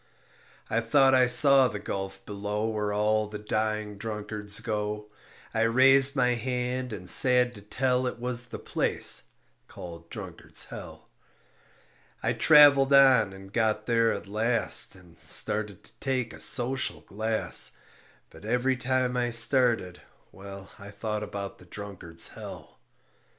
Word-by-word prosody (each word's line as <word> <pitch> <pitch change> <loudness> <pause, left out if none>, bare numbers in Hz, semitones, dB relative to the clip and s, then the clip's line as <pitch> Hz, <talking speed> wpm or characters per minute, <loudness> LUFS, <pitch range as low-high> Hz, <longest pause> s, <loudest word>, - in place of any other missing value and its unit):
I 115 - -1
thought 135 +3 +3
I 130 -1 +4
saw 135 +1 +6
the 105 - -6
gulf 95 -1 -7
below 105 +1 -4
Where 105 -2 -3
all 105 +1 0
the 105 0 -8
dying 105 -1 -3
drunkards 105 -1 -4
go. 105 -1 -5 0.4
I 115 - -1
raised 135 +4 +4
my 125 -2 +2
hand 125 +1 -4
and 95 -4 -8
sad 125 +4 +6
to 105 - -13
tell 125 +4 -1
It 125 - -5
was 125 0 -5
the 120 - -9
place - - -1 0.4
called 85 -1 -11
Drunkard's - - -6
Hell. - - -11 1.2
I - - 0
traveled 145 -3 +5
on 135 -7 +5
and 95 +1 -14
got 110 -2 -1
there 115 -1 +1
at - - -5
last 110 +1 +1
And 90 -3 -19
started 105 -2 -1
to - - -18
take 130 -4 -3
a - - -12
social 130 +1 +1
glass; 110 +2 -1 0.5
But - - -16
every 125 +4 -1
time 125 0 -1
I 120 -1 -1
started, 115 -5 +3 0.3
well, 100 0 -12
I 100 0 -11
thought 105 +1 -5
about 100 -2 -7
the 90 - -16
Drunkard's 90 -3 -6
Hell. - - -11
110 Hz, 140 wpm, -26 LUFS, 105-125 Hz, 1.2 s, saw